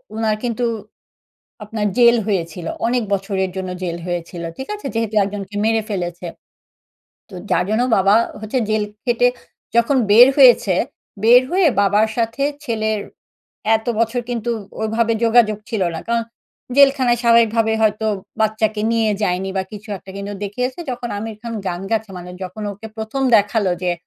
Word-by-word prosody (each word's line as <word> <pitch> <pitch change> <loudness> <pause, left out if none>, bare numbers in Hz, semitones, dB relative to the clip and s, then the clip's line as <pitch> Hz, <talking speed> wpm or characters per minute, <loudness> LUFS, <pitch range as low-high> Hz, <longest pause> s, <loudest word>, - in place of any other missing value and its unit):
উনার 220 -1 0
কিন্তু 240 0 -1 1.0
আপনার 210 0 -2
জেল 240 -1 +6
হয়েছিল। 170 -4 -2 0.2
অনেক 245 0 +1
বছরের 195 -1 -1
জন্য 190 -1 -4
জেল 170 -1 -3
হয়েছিল। 175 0 -4
ঠিক 265 - -6
আছে? 420 - -12
যেহেতু 225 -1 -1
একজনকে 200 0 -6
মেরে 225 0 +2
ফেলেছে। 175 -3 -4 1.0
তো 195 - -13 0.2
যার 180 - +2
জন্য 220 +3 +2
বাবা 195 +1 +4 0.3
হচ্ছে 215 +4 -2
জেল 215 0 +1 0.2
খেটে 245 0 +3 0.5
যখন 235 +4 +3
বের 240 +5 +9
হয়েছে, 245 -8 +6 0.5
বের 245 +2 +7
হয়ে 370 0 +3
বাবার 205 +2 +3
সাথে 230 +3 -1 0.2
ছেলের 220 -4 -1 0.8
এত 220 - -11
বছর 230 +2 +1
কিন্তু 240 -1 -2 0.3
ওইভাবে 225 +1 +1
যোগাযোগ 225 -2 +4
ছিল 220 -4 -1
না, - - -5
কারণ 235 0 +1 0.5
জেলখানায় 270 -4 +5
স্বাভাবিকভাবে 230 -1 +4
হয়তো 215 0 +1 0.3
বাচ্চাকে 215 0 +1
নিয়ে 225 -2 +2
যায়নি 190 0 0
বা - - +1
কিছু 210 +2 -10
একটা। 190 - -13
কিন্তু 200 +1 -5
দেখিয়েছে 250 - -3
যখন 245 -1 -4
আমির 220 +1 -6
খান 235 -1 -5
গান 175 -1 -4
গাচ্ছে 220 -2 -1
মানে 180 0 -9
যখন 185 +4 -7
ওকে 205 +3 -10
প্রথম 220 +5 -3
দেখালো 205 -2 +1
যে 180 -1 +1
220 Hz, 150 wpm, -19 LUFS, 200-235 Hz, 1.0 s, বের